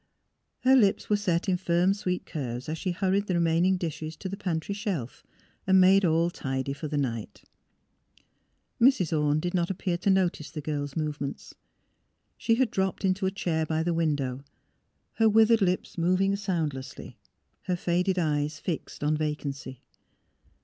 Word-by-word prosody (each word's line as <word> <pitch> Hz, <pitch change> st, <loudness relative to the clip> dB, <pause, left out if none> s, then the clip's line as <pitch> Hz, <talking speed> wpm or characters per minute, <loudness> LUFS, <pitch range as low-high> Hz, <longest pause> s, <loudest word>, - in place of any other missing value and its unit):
Her 260 Hz, +1 st, +5 dB
lips 210 Hz, -4 st, +2 dB
were -, -, +6 dB
set 185 Hz, -3 st, 0 dB
in 185 Hz, -1 st, +2 dB
firm, 175 Hz, +1 st, +2 dB
sweet 180 Hz, -3 st, -3 dB
curves 125 Hz, -5 st, -5 dB
as 155 Hz, +1 st, -3 dB
she 190 Hz, -, -2 dB
hurried 190 Hz, +3 st, 0 dB
the 180 Hz, -, 0 dB
remaining 170 Hz, +2 st, +2 dB
dishes 160 Hz, -2 st, -5 dB
to 190 Hz, -, -6 dB
the 190 Hz, -, -4 dB
pantry 180 Hz, -2 st, -3 dB
shelf 195 Hz, -, -4 dB, 0.4 s
and 190 Hz, 0 st, +6 dB
made 190 Hz, +2 st, +6 dB
all 170 Hz, 0 st, +2 dB
tidy 135 Hz, -2 st, -3 dB
for 150 Hz, +2 st, -6 dB
the 150 Hz, 0 st, -2 dB
night. 115 Hz, -6 st, -3 dB, 1.4 s
Mrs. 215 Hz, -, +4 dB
Orne 150 Hz, 0 st, +2 dB
did 175 Hz, +2 st, -3 dB
not 175 Hz, -2 st, +1 dB
appear 180 Hz, -2 st, -2 dB
to 195 Hz, -, 0 dB
notice 185 Hz, -5 st, +1 dB
the -, -, -6 dB
girl's 145 Hz, -2 st, -4 dB
movements. 150 Hz, -3 st, -4 dB, 0.8 s
She 230 Hz, -, +1 dB
had 255 Hz, 0 st, +1 dB
dropped 190 Hz, 0 st, -1 dB
into 190 Hz, +1 st, +1 dB
a -, -, 0 dB
chair 170 Hz, -5 st, -1 dB
by 160 Hz, +1 st, -1 dB
the 175 Hz, +1 st, 0 dB
window, 145 Hz, -5 st, -1 dB, 0.7 s
her 225 Hz, -1 st, +5 dB
withered 225 Hz, +1 st, +5 dB
lips 180 Hz, -1 st, -1 dB
moving 185 Hz, +3 st, +2 dB
soundlessly, 160 Hz, -10 st, -4 dB, 0.5 s
her 180 Hz, -, 0 dB
faded 180 Hz, +1 st, 0 dB
eyes 150 Hz, -2 st, 0 dB
fixed 160 Hz, -2 st, -5 dB
on 150 Hz, +1 st, +2 dB
vacancy. 145 Hz, -4 st, -4 dB
175 Hz, 160 wpm, -27 LUFS, 150-190 Hz, 1.4 s, were